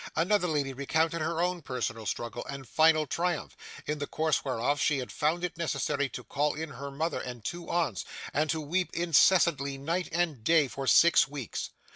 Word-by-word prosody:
Another 180 +3 +2
lady 145 -4 -1
recounted 160 +4 0
her 165 +1 -1
own 180 -1 -1
personal 115 -5 -4
struggle 120 0 -3
and 140 -2 -7
final 155 +1 +4
triumph, 170 +3 -2 0.3
in 150 0 -2
the 145 - -3
course 155 -1 0
whereof 135 +2 0
she 150 - +2
had 125 -5 -5
found 160 +4 0
it 180 - -2
necessary 145 -4 -1
to 125 +1 -7
call 145 +3 0
in 160 +1 -4
her 140 +1 -7
mother 155 +5 -2
and 120 -3 -7
two 170 -1 -5
aunts, 160 - 0 0.3
and 155 +2 +1
to 160 - 0
weep 175 +5 -1
incessantly 165 -4 +3
night 165 +6 -2
and 160 -8 -1
day 160 +2 +4
for 135 +1 -6
six 170 +4 +6
weeks. 140 -5 -5
150 Hz, 185 wpm, -29 LUFS, 135-170 Hz, 0.3 s, six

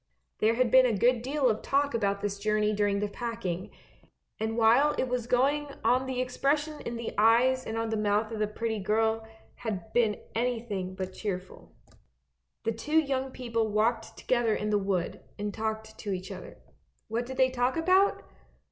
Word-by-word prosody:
( - - -50
There 220 +2 +3
had 250 -1 +2
been 260 -1 +7
a 225 -4 0
good 240 +3 +3
deal 270 +2 +1
of 220 -2 +1
talk 285 +1 +1
about 200 -3 0
this 200 -1 -3
journey 215 0 +1
during 205 -1 +1
the 210 - 0
packing, 205 -5 -4 0.7
and 220 +1 -2
while 240 +6 +5
it 260 - 0
was 245 -2 -2
going 280 +4 +2 0.2
on 255 +1 +2
the 260 -1 -2
expression 290 +4 0
in 235 - -5
the 235 - -5
eyes 245 +4 +4
and 220 - -3
on 225 0 -1
the 220 - 0
mouth 210 +1 +1
of 220 - -4
the 210 - +1
pretty 220 +1 -3
girl 220 +2 +1 0.3
had 220 -2 -5
been 225 -3 +2
anything 225 -6 -2
but 185 0 -5
cheerful. 190 -3 -6 0.9
The 225 - +1
two 295 +8 -1
young 270 -3 -1
people 230 -3 -2
walked 225 +2 0
together 240 -3 +1
in 210 0 -2
the 205 - +3
wood, 195 -3 -2 0.2
and 205 0 -3
talked 220 0 -4
to 205 - -4
each 185 0 -4
other. - - -9 0.5
What 235 +2 -2
did 260 0 -7
they 260 -1 +4
talk 250 +3 0
about? 370 +4 +3
225 Hz, 185 wpm, -29 LUFS, 210-255 Hz, 0.9 s, been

